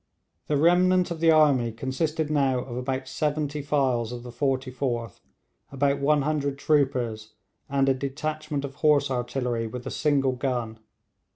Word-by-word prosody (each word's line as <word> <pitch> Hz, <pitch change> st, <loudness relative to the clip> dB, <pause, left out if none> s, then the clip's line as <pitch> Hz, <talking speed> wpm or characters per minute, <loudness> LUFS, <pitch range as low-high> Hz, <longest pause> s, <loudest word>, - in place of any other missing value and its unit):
The 150 Hz, -, +1 dB
remnant 180 Hz, +3 st, +3 dB
of 165 Hz, -, -4 dB
the 165 Hz, 0 st, +4 dB
army 145 Hz, -7 st, +4 dB
consisted 150 Hz, +6 st, -2 dB
now 135 Hz, -3 st, +2 dB
of 120 Hz, -2 st, -7 dB
about 130 Hz, +1 st, -3 dB
seventy 150 Hz, +1 st, -2 dB
files 130 Hz, -5 st, 0 dB
of 120 Hz, -1 st, -7 dB
the 120 Hz, -, -8 dB
44th, 130 Hz, -2 st, -2 dB, 0.5 s
about 140 Hz, +1 st, +1 dB
100 145 Hz, -1 st, +1 dB
troopers, 125 Hz, -8 st, 0 dB, 0.3 s
and 135 Hz, 0 st, +1 dB
a 135 Hz, -, +4 dB
detachment 145 Hz, +2 st, -3 dB
of 135 Hz, -, -7 dB
horse 145 Hz, -3 st, +3 dB
artillery 120 Hz, -2 st, -2 dB
with 125 Hz, +2 st, -7 dB
a -, -, -4 dB
single 140 Hz, -3 st, +1 dB
gun. 125 Hz, -4 st, -3 dB
135 Hz, 145 wpm, -26 LUFS, 125-150 Hz, 0.5 s, the